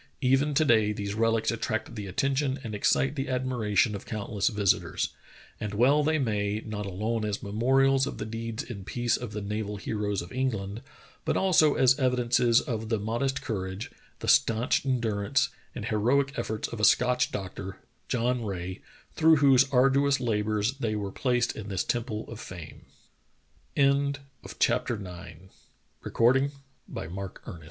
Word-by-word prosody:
Even 135 +3 +2
to 155 - +4
day 110 -5 +4
these 100 -1 -4
relics 115 +1 +1
attract 115 0 -3
the 105 -3 -6
attention 135 +6 0
and 110 -3 -5
excite 130 +6 +2
the 135 -1 -3
admiration 125 -5 +1
of 100 - -6
countless 105 -2 -2
visitors. 105 -4 +1 0.5
And 105 -1 -4
well 140 +7 +4
they 155 +1 +2
may, 105 -5 0
not 105 -2 -4
alone 110 +4 -2
as 105 -2 -3
memorials 135 +6 +2
of - - -5
the - - -4
deeds 115 0 -4
in 110 -5 -8
peace 120 +4 0
of 125 -3 -5
the 105 -1 -5
naval 105 0 -3
heroes 105 -2 -2
of 85 - -11
England, 110 -5 -2 0.4
but - - 0
also 160 -6 +4
as 130 +1 +4
evidences 120 -2 +3
of 110 -2 -4
the 115 - +1
modest 120 +6 -2
courage, 95 -2 -4 0.3
the - - -5
stanch 115 +2 +3
endurance, 120 0 +1 0.3
and 110 - -5
heroic 125 +6 +1
efforts 110 0 -3
of 115 - -7
a - - -3
Scotch 125 +3 +4
doctor, 95 0 -6 0.3
John 125 0 0
Rae, 95 -3 -5 0.3
through 160 - +5
whose 135 -2 +5
arduous 135 +2 +3
labors 110 +2 0
they 110 -4 -1
were 100 -2 -3
placed 125 0 0
in 110 -1 -7
this 95 -2 -1
temple 115 -3 -2
of 115 - -8
115 Hz, 140 wpm, -28 LUFS, 105-130 Hz, 0.5 s, through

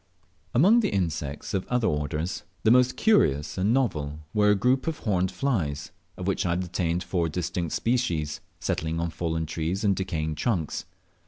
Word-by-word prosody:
Among 195 - +6
the 230 - +1
insects 80 -7 -2
of 95 -2 -1
other 125 -2 +1
orders, 75 +4 -2 0.2
the 110 - +5
most 125 +1 +4
curious 75 - +3
and 95 +4 +1
novel 80 - 0 0.2
were 105 -1 +4
a 105 - +5
group 125 +8 +2
of 160 -1 -1
horned 95 -4 0
flies, 80 - -1 0.3
of 90 - -5
which 95 - 0
I 85 - +1
obtained 90 -1 -1
four 85 -2 0
distinct 85 0 -2
species, 85 -12 0 0.2
settling 80 +1 -1
on 85 0 -1
fallen 80 -1 -2
trees 80 +6 -2
and 100 -2 +3
decaying 80 -4 -2
trunks. 80 - -1
90 Hz, 165 wpm, -26 LUFS, 80-110 Hz, 0.3 s, Among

